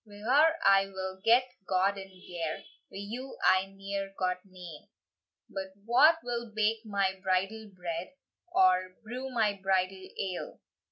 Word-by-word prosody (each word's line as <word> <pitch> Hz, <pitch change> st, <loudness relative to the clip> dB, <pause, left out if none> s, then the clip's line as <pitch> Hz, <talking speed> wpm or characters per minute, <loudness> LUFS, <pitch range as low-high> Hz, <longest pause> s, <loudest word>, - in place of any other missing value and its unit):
Wi 205 Hz, -2 st, -14 dB
her 285 Hz, +10 st, +4 dB
I 195 Hz, 0 st, +6 dB
will 190 Hz, -1 st, -6 dB
get 240 Hz, +3 st, +5 dB, 0.2 s
gowd 190 Hz, +2 st, +2 dB
and 195 Hz, -1 st, -8 dB
gear; 175 Hz, -4 st, -5 dB, 0.3 s
Wi -, -, -10 dB
you 255 Hz, +5 st, -7 dB
I 185 Hz, +1 st, +4 dB
neer 195 Hz, 0 st, -5 dB
got 180 Hz, -1 st, 0 dB
nane. 180 Hz, -6 st, -11 dB, 0.6 s
"But 190 Hz, 0 st, -6 dB
wha 255 Hz, +8 st, +6 dB
will 235 Hz, -2 st, -4 dB
bake 220 Hz, +1 st, +1 dB
my 195 Hz, -3 st, 0 dB
bridal 195 Hz, +4 st, -1 dB
bread, 175 Hz, -, -5 dB, 0.4 s
Or 185 Hz, -, +3 dB
brew 250 Hz, +4 st, -5 dB
my 225 Hz, -5 st, +2 dB
bridal 190 Hz, 0 st, 0 dB
ale? 185 Hz, -2 st, -4 dB
195 Hz, 145 wpm, -30 LUFS, 185-220 Hz, 0.6 s, I